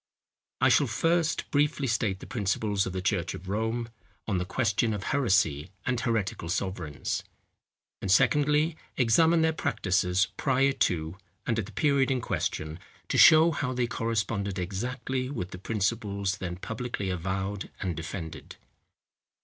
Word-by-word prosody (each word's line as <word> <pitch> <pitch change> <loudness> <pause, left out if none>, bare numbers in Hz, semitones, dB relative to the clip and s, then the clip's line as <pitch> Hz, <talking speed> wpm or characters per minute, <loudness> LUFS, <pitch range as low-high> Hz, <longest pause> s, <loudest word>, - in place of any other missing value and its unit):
I - - +6
shall - - +4
first 165 -1 0
briefly 145 -1 +2
state 110 -5 0
the - - -8
principles 105 -2 0
of 95 - -4
the 95 -1 -3
church - - 0
of 95 - -10
Rome, 110 +4 -1 0.4
on 100 -4 0
the 90 - -2
question 110 +1 +1
of 100 - -5
heresy 95 - +1 0.2
and 125 -2 0
heretical 110 -8 -1
sovereigns; 90 -5 -2 0.8
and 95 - -3
secondly, 150 - +3 0.2
examine 160 +7 +4
their 160 0 +2
practices 95 - +1
prior 135 0 +3 0.2
to, 80 +1 -4 0.3
and 115 -2 0
at 100 - -3
the - - -11
period 140 -3 +2
in 130 -1 +1
question, 80 -7 -3 0.3
to - - +2
show 160 +1 +8
how 140 -4 -2
they 125 -1 +1
corresponded 105 -4 -2
exactly 125 +7 -3
with 95 -10 -4
the 90 - -8
principles 100 -1 -1
then 90 -1 -4
publicly 110 0 -4
avowed 95 +3 -3
and 90 -4 -2
defended. 80 +1 -7
105 Hz, 145 wpm, -28 LUFS, 95-130 Hz, 0.8 s, show